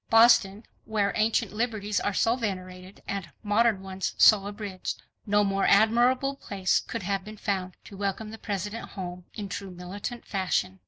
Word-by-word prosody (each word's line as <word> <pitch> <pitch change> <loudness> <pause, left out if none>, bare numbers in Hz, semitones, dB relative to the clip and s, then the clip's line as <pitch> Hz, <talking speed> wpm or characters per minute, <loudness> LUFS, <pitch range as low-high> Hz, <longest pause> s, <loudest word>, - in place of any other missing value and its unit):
Boston, 225 -2 +5 0.2
where 205 -2 0
ancient 220 0 +1
liberties 210 -2 -1
are 205 - 0
so 225 +4 +2
venerated, 185 -4 -5
and 195 -3 -4
modern 210 -1 +2
ones 190 0 -4
so 200 -2 +6
abridged. 205 -3 -5 0.2
No 205 0 +4
more 195 -1 +1
admirable 240 +6 +4
place 195 -7 0
could - - -5
have 195 +1 -1
been 215 +2 -10
found 190 -3 -2
to 200 - -12
welcome 200 +2 -3
the 225 - -9
President 205 +2 -4
home 180 -1 -7
in 205 -2 -4
true 195 +1 -5
militant 190 +7 -7
fashion. 185 0 -1
200 Hz, 160 wpm, -27 LUFS, 190-220 Hz, 0.2 s, so